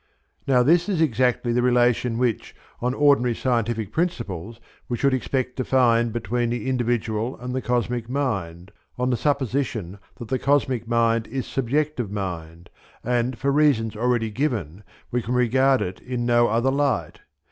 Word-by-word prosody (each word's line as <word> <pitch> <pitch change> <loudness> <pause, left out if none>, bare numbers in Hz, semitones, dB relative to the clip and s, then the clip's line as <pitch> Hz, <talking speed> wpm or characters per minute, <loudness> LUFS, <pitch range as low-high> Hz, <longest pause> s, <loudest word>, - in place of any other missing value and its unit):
Now 125 -2 +4
this 170 +7 +3
is 190 -5 0
exactly 125 -4 +1
the 125 - +2
relation 120 -1 +2
which, 120 -4 -1 0.2
on 125 +2 -1
ordinary 140 -5 +3
scientific 115 -4 -1
principles, 115 - -3 0.3
we 120 - -1
should 140 +1 +2
expect 130 0 -2
to 130 - 0
find 120 -3 +3
between 120 +2 -1
the 120 +2 -3
individual 120 -2 -1
and 125 0 -5
the 130 - -1
cosmic 120 -1 -1
mind, 100 -10 -3 0.3
on 125 +1 0
the - - +2
supposition 120 - -1 0.2
that 120 - -9
the 130 -1 0
cosmic 130 -4 +1
mind 115 -1 +1
is 130 +2 -4
subjective 135 -2 -1
mind, 85 -4 -6 0.3
and 120 0 0
for 140 +3 0
reasons 140 -7 +2
already 115 -1 0
given 105 - -2 0.3
we 125 - 0
can 120 +2 -3
regard 130 +2 +3
it 90 0 -6
in 125 -1 -3
no 120 0 +4
other 120 +4 +1
light. 140 -3 -1
120 Hz, 160 wpm, -23 LUFS, 115-130 Hz, 0.3 s, Now